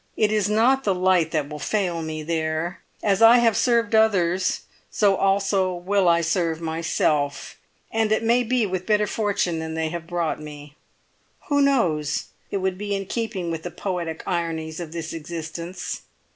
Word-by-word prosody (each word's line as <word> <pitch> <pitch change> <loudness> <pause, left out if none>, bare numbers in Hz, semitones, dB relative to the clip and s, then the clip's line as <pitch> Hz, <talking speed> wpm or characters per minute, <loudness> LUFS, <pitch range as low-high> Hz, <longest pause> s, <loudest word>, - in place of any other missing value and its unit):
It 215 -1 +3
is 210 -2 +1
not 245 +6 +3
the 195 -2 +1
light 180 -3 +3
that 155 -3 -1
will 150 0 -7
fail 180 -2 -1
me, 155 -1 -5
there; 160 +2 -2 0.2
and 205 - +2
as 195 - +1
I 230 +2 +9
have 230 -3 +3
served 235 -2 +2
others, 190 -5 +2 0.3
so 200 -2 +3
also 195 -1 +1
will 185 +1 +2
I 170 0 +4
serve 165 -1 0
myself, 160 -1 -1 0.4
and 220 -1 +1
it 220 +1 +2
may 235 +2 +3
be 245 -1 +1
with 185 -2 -4
better 210 -1 +3
fortune 205 -5 -1
than 160 0 -4
they 160 0 -1
have 170 0 -6
brought 170 -3 -2
me. 145 -1 -10 0.7
Who 285 -1 +3
knows? 170 - +1 0.2
It - - -1
would 190 -1 -2
be 205 -1 -2
in 195 0 -3
keeping 200 -5 -3
with 165 -1 -3
the 175 - -5
poetic 175 -3 -4
ironies 165 -3 -2
of 170 -3 -6
this 165 -1 -5
existence. 165 +2 -6
180 Hz, 175 wpm, -23 LUFS, 160-210 Hz, 0.7 s, I